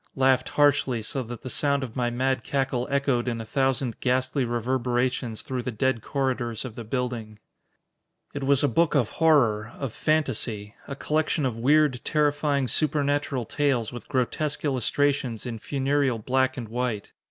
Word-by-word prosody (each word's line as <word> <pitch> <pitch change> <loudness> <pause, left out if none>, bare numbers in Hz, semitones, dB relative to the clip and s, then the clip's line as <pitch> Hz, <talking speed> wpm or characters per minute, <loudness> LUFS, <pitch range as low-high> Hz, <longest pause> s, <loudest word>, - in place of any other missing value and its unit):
Laughed 130 -1 +3
harshly, 140 -5 +3
so 135 +5 -2
that 120 -1 -8
the - - -6
sound 140 -1 +1
of 120 -4 -7
my 120 -2 0
mad 130 0 0
cackle 135 -3 -1
echoed 140 -3 +1
in 115 -2 -1
a 115 - -5
thousand 130 -1 0
ghastly 130 +2 +1
reverberations 120 0 -1
through 130 -2 -3
the 125 - -4
dead 120 +1 0
corridors 125 -3 -2
of 125 - -6
the 115 - -7
building. 115 -2 -3 1.0
It 145 - -4
was 140 +1 +3
a - - +5
book 165 0 +2
of 125 -7 +2
horror, 120 -9 +3
of 135 -6 -4
fantasy. 115 -9 0
A 140 - -5
collection 155 +1 0
of 115 -3 -2
weird, 145 0 +3
terrifying, 145 -2 +1
supernatural 145 -3 0
tales 125 -3 0
with 120 - -9
grotesque 145 +4 -1
illustrations 135 -2 0
in 115 -2 -5
funereal 135 0 0
black 130 +4 0
and 120 -3 -5
white. 120 -2 -3
130 Hz, 160 wpm, -26 LUFS, 120-140 Hz, 1.0 s, a